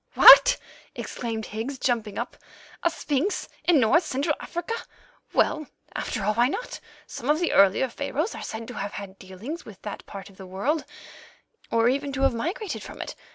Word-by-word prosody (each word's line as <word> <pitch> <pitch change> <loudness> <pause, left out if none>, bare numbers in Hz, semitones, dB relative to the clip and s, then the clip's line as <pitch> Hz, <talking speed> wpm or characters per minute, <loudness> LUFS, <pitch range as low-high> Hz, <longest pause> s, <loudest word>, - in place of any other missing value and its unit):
"What!" - - +10 0.4
exclaimed 225 -2 -4
Higgs, 230 +6 -4
jumping 225 -5 -1
up, 240 - -4 0.5
"a 340 - +3
sphinx 335 +4 -1 0.2
in 340 -5 +5
North 270 +9 +4
Central 290 0 0
Africa! 345 +6 -4 0.6
Well, 310 -2 +1 0.3
after 210 - -3
all, 210 +2 +2
why 240 +3 +4
not? 485 - -4 0.3
Some 255 - -6
of 300 +1 +4
the 345 - 0
earlier 200 +6 +5
Pharaohs 285 - -2
are - - -7
said 225 +1 -6
to - - -6
have 200 -3 -4
had 195 -1 -8
dealings 200 - -7
with 200 -4 -12
that 210 - -6
part 200 0 -9
of 190 - -21
the 190 - -10
world, 255 - -1 0.8
or 230 0 +3
even 275 +3 0
to 270 +1 -1
have 270 - +4
migrated 345 - -3
from - - -10
it. - - -5
250 Hz, 180 wpm, -26 LUFS, 215-310 Hz, 0.8 s, What